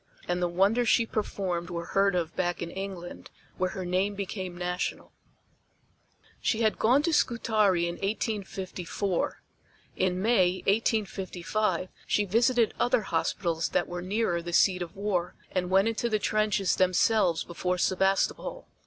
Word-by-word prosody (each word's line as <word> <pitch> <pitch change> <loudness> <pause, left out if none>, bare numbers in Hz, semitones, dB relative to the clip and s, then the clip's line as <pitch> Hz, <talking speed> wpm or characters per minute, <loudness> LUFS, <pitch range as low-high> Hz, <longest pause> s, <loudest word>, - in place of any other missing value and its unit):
And 175 0 -1
the 175 - +2
wonders 200 +7 +2
she 230 - +4
performed 185 -6 -3
were 170 -1 -4
heard 195 +1 +2
of 165 -2 -2
back 175 -1 -1
in 170 - -6
England, 190 -2 -7 0.3
where 185 0 +1
her 185 0 -5
name 190 +3 0
became 190 -2 -5
national. 180 0 -3 1.3
She 225 - 0
had 220 - +1
gone 255 +6 +4
to 335 0 +1
Scutari 215 - +2
in 170 - -4
1854. 195 -3 -3 0.5
In 185 -1 0
May, 185 -4 +2
1855, 195 -3 0 0.2
she 210 - +2
visited 230 +3 +2
other 245 - +3
hospitals 165 -1 -1
that - - 0
were 175 0 -5
nearer 185 -2 0
the 175 0 -6
seat 185 +1 +4
of 175 - -6
war 195 -3 -1 0.2
and 180 -1 -1
went 195 +3 +4
into 230 +1 -1
the 215 - +2
trenches 215 -2 +1
themselves 185 -1 +3
before 180 +1 -2
Sebastopol. 190 +2 0
190 Hz, 145 wpm, -28 LUFS, 180-215 Hz, 1.3 s, she